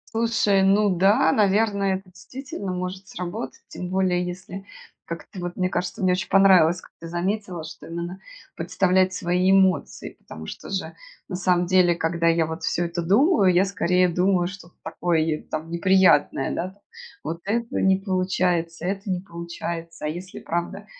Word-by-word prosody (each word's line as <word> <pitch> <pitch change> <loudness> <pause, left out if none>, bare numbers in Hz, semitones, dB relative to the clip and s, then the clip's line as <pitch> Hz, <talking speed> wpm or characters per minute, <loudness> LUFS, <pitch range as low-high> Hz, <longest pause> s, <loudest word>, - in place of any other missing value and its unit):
Слушай, 225 -3 +2
ну 200 +1 +4
да, 195 +4 +4
наверное, 200 -1 +2
это 190 -1 -16
действительно 205 -2 -7
может 185 +1 -5
сработать. 175 -9 -6
Тем 180 0 -7
более, 185 -1 +1
если, 180 +2 -7 0.4
как-то, 170 +2 -8
вот, 175 0 -5
мне 185 0 0
кажется, 180 +3 -3
мне 185 - +4
очень 180 -1 -1
понравилось, 185 -3 +5
как - - -18
ты 165 - -7
заметила, 180 0 -3
что 160 +1 -10
именно, 170 +2 -5 0.4
представлять 185 0 +2
свои 180 +1 +1
эмоции. 190 -2 +2
Потому 80 0 -10
что, - - -8
же, 190 -1 -3 0.4
на 185 - -3
самом 180 -1 +2
деле, 180 -1 +4
когда 170 0 0
я, 165 -1 +3
вот, 160 +1 -6
всё 165 +1 0
это 170 +1 -3
думаю, 200 - +4
я, 180 +2 +4
скорее, 180 -1 +2
думаю 180 +1 +1
что-то 185 -2 -11
такое, 165 +1 -1
й 155 -1 -1
там 155 +1 -5
неприятное, 170 -6 +3
да 175 - -2
там, 200 - -28 0.4
вот 165 +2 -4
этого 230 +3 -1
не 190 0 +4
получается, 185 -3 -1
это 195 +2 -3
не 185 -1 0
получается. 170 -2 -6
А - - 0
если 175 +5 -6
и - - -9
правда, 170 +1 -3
180 Hz, 170 wpm, -24 LUFS, 170-195 Hz, 0.4 s, понравилось